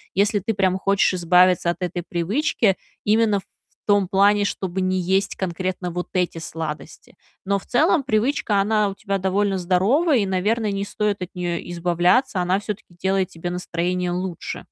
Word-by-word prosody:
если 205 +1 +2
ты 210 +2 -2
прям 190 -1 +1
хочешь 195 0 +2
избавиться 180 0 +4
от 170 - -1
этой 175 0 -3
привычки 195 - 0 0.3
именно 215 -1 +3
в - - -14 0.4
том 205 -2 +3
плане, 205 +2 +3
чтобы 190 -2 -3
не 185 0 0
есть 190 +2 0
конкретно 185 0 -3
вот 180 +1 -4
эти 180 -2 0
сладости. 160 -1 -7 0.3
Но 200 0 0
в - - -17
целом 295 +3 +2
привычка, 215 -3 +1
она 210 0 +2
у 195 - -3
тебя 200 -1 -2
довольно 195 +1 0
здоровая 215 - +2
и, 205 - +1
наверное, 205 +3 0
не 195 0 -2
стоит 205 -1 -2
от 180 - -3
неё 175 -1 -2
избавляться, 175 +6 +1
она 185 +2 +1
всё-таки 205 -4 -7
делает 190 +1 0
тебе 170 +1 -6
настроение 180 0 -2
лучше. 180 -1 -4
190 Hz, 165 wpm, -22 LUFS, 180-205 Hz, 0.4 s, избавиться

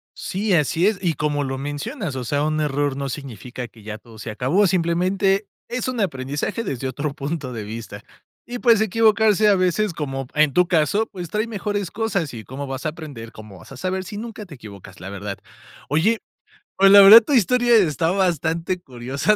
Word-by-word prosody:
Sí, 200 +2 -2
así 165 +3 +2
es, 215 -1 +1
y 175 -3 +1
como 150 -1 -1
lo 135 -1 -3
mencionas, 145 - -4
o 130 - -4
sea, 145 +4 -1
un 155 0 0
error 145 -2 -1
no 140 0 -3
significa 125 -2 -7
que 115 -1 -18
ya 105 0 -6
todo 115 -1 -16
se 110 +1 -6
acabó, 135 - +2
simplemente 185 +3 +1 0.2
es 250 0 -3
un 255 -2 -3
aprendizaje 145 - -2
desde 135 - -3
otro 140 +3 -3
punto 140 -2 -4
de 110 -2 -5
vista, 105 -1 -8 0.5
y, 245 0 -4
pues, 235 -3 +5
equivocarse, 220 0 +3
a 205 - +5
veces 185 +3 +1
como 135 -3 -4
en 150 -2 +3
tu 180 +3 +3
caso, 175 +6 +2
pues 180 -5 -7
trae 215 +5 -1
mejores 205 -3 -3
cosas. 200 - -2
¿Y 110 -3 -8
cómo 135 +6 -6
vas 135 +2 -6
a - - +1
aprender, 145 -8 -9
cómo 105 -4 -12
vas 110 - -13
a - - -10
saber 185 +5 -3
si 205 - -8
nunca 215 0 -7
te 170 -6 -11
equivocas? 100 -6 -12
La 95 - -7
verdad. 100 0 -6 0.5
Oye, 185 - +2 0.6
pues, 195 0 +6
la 200 0 +10
verdad, 210 +4 +11
tu 265 +6 -3
historia 245 +1 +4
está 165 - +2
bastante 175 -1 0
curiosa, 135 - -1
160 Hz, 200 wpm, -22 LUFS, 135-200 Hz, 0.6 s, verdad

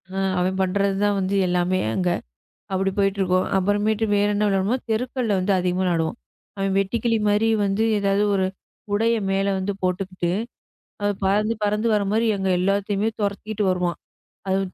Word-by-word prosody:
ஆ. - - -1 0.2
அவன் 185 +1 0
பண்றது 195 +1 +1
தான் 205 -1 +1
வந்து 195 +1 -1
எல்லாமே 180 +1 +1 0.2
அங்க. 180 -1 +1 0.6
அப்படி 195 0 0
போயிட்டு 200 0 +1
இருக்கோம். 185 0 +2
அப்புறமேட்டு 205 +3 +1
வேற 205 0 +3
என்ன 210 +1 +1
விளையாடுவோம்னா 200 +5 +1
தெருக்கள்ல 245 0 -1
வந்து 185 +2 0
அதிகமா 180 0 0
விளையாடுவோம். 170 +3 0 0.4
அவன் 195 0 0
வெட்டிக்கிளி 225 +4 +1
மாதிரி 210 +2 +2 0.2
வந்து 200 +2 +1
ஏதாவது 200 0 +1
ஒரு 190 -1 +2 0.5
உடைய 225 +3 +2
மேல 195 +1 +1
வந்து 190 +2 -2
போட்டுக்கிட்டு, 185 -1 -2 0.9
பறந்து 210 +3 +2
பறந்து 210 +2 +1
வர 210 -1 +2
மாதிரி 225 +2 +2
எங்க 190 -1 -1
எல்லாத்தையுமே 200 +3 +1
துரத்திக்ட்டு 210 +1 -2
வருவான். 180 -2 0 0.5
அது 190 +1 +2
195 Hz, 150 wpm, -23 LUFS, 185-210 Hz, 0.9 s, வேற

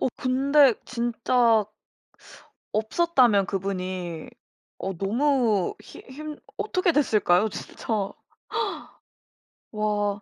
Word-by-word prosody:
어 - - +2
근데 270 +1 +4
진짜 235 -2 +2 1.1
없었다면 220 - +3
그분이 185 -4 -4 0.5
어 190 -2 -4
너무 230 -2 +1
힘 - - -13
힘 300 +2 -7 0.2
어떻게 365 -4 +1
됐을까요? 215 -8 +3
진짜. 205 0 -4 1.6
와 210 -1 -1
220 Hz, 160 characters per minute, -25 LUFS, 200-265 Hz, 1.6 s, 근데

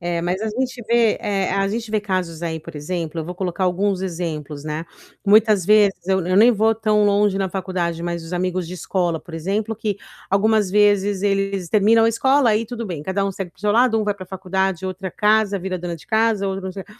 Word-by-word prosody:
É, 170 -1 -2
mas 180 +2 -1
a 220 - -1
gente 255 +3 -3
vê, 235 -2 +3
eh, 195 -2 -1
a 195 0 +1
gente 225 +2 -4
vê 215 -1 +1
casos 185 -5 -3
aí, 160 -1 -3
por 155 - -11
exemplo, 165 +1 -4
eu 155 - -4
vou 180 - -5
colocar 185 0 -3
alguns 190 +1 0
exemplos, 160 -5 -4
né, 155 +2 -4 0.4
muitas 210 -2 +4
vezes, 210 -2 +4
eu 190 0 +2
eu 185 +1 0
nem 235 +3 +7
vou 220 +1 +2
tão 215 -1 +2
longe 205 -1 +3
na 195 -1 -1
faculdade, 175 -3 -3
mas 170 -1 -3
os 165 - -10
amigos 180 -1 -2
de 180 - -7
escola, 175 -2 -1
por 170 - -14
exemplo, 200 +7 -2
que, 210 -2 -3 0.3
algumas 210 0 +2
vezes, 205 -1 +2
eles 195 -2 0
terminam 225 +3 +4
a - - +4
escola, 265 +1 +3
aí 215 +2 +1
tudo 235 0 -6
bem. 170 -6 -5
Cada 190 +4 -1
um 195 - -1
segue 185 -2 -6
para 155 - -40
o - - -20
seu 210 0 +2
lado, 230 0 +3
um - - 0
vai 205 -1 0
pra 190 -2 -10
faculdade, 190 -1 -2
outra 185 0 -5
casa, 210 -1 +2
vira 185 0 -4
dona 175 -1 -4
de 160 - -15
casa, 220 -3 +1
outro 190 0 -4
não 190 - -4
sei 195 0 -7
o - - -31
195 Hz, 235 wpm, -21 LUFS, 180-210 Hz, 0.4 s, nem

